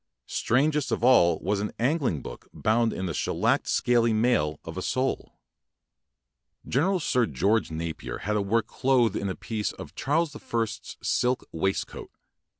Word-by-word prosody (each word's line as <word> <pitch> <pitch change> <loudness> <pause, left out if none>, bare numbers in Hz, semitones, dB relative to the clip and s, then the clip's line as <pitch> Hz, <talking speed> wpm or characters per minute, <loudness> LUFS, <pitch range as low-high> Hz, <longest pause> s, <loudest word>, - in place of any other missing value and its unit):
Strangest 145 +3 +1
of 115 - -1
all 85 -10 +5
was 100 +1 0
an 105 - -3
angling 125 - 0
book - - -10
bound 115 +1 +1
in 95 - -4
the 85 - -2
shellacked - - 0
scaly 120 -1 +2
mail 110 - +1
of - - -7
a - - -3
sole. 130 +1 -2 1.3
Gene 135 - +1
ral 190 +3 +2
Sir 125 -6 +1
George 100 - +1
Napier 80 0 -5
had 105 +1 0
a 105 - +2
work 110 +3 +1
clothed 125 -1 +2
in 100 - -2
a 95 - -3
piece 110 -2 -3
of - - -10
Charles 150 +2 0
the 145 - -9
First's 115 -3 -3
silk 125 +1 0
waist 95 +4 0
coat. - - -10
115 Hz, 165 wpm, -27 LUFS, 100-130 Hz, 1.3 s, all